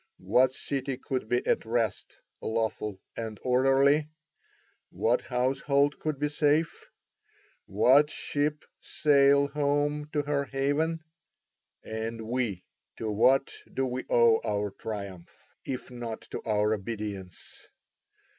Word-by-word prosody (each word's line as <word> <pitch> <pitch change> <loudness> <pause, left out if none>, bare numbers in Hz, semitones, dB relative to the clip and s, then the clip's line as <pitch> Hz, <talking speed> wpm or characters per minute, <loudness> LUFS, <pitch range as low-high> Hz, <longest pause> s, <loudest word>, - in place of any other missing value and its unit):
What 120 +8 +3
city 135 0 -3
could 130 -4 -4
be 120 0 +1
at - - +1
rest, 115 -2 -2 0.2
lawful, 110 -3 -2 0.2
and 110 -2 -5
orderly? 135 +4 +3 0.8
What 120 +2 +1
household 135 +3 +1
could 155 -2 -2
be 150 +2 0
safe? 150 +2 0 0.8
What 130 +9 +5
ship 150 0 -2
sail 140 -1 +3
home 145 +1 0
to 150 -1 +1
her 145 -1 0
haven? 145 +4 -1 0.8
And 110 +1 -4
we, 115 -6 -2 0.3
to 110 -1 -3
what 130 +6 +3 0.2
do 135 - -1
we 130 0 -3
owe 115 -1 +5
our 105 -1 -1
triumph, 100 -4 -8
if 130 -1 -5
not 120 -2 -6
to - - -4
our 105 0 +2
obedience? 100 -3 -6
130 Hz, 115 wpm, -28 LUFS, 110-145 Hz, 0.8 s, What